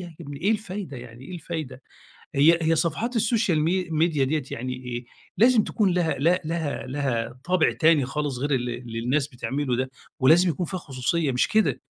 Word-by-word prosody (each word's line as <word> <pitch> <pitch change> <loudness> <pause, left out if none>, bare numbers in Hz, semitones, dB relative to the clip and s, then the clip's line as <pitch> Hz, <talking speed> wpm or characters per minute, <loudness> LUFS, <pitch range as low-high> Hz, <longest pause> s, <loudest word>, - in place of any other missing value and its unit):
يا 175 -2 -9
ابني 145 -3 -8
إيه 200 - +2
الفايدة 200 -8 -3
يعني، 120 0 -11
إيه 185 - -8
الفايدة؟ 155 -6 -6 0.5
هي 160 +5 +5
هي 160 +1 +3
صفحات 215 - -1
السوشيال 215 -7 +2
مي 180 +3 0
ميديا 155 -3 +2
ديّة 150 +3 0
يعني 125 +2 -4
إيه، 125 -1 -6 0.3
لازم 235 -1 +5
تكون 205 -5 +1
لها 175 -3 +1
ل 170 +6 +3
لها 160 -4 -3
لها 125 -3 -2
طابع 180 -2 +3
تاني 155 -3 +4
خالص 140 0 -3
غير 145 +3 -2
اللي 120 -2 -2
اللي 115 -2 -7
الناس 130 +5 0
بتعمله 130 0 -2
ده، 130 +1 -2 0.3
ولازم 165 +8 +6
يكون 170 +2 -1
فيها 185 - -4
خصوصيّة 140 +1 -1
مش 125 - +1
كده، 220 0 +2
150 Hz, 185 wpm, -25 LUFS, 130-175 Hz, 0.5 s, ولازم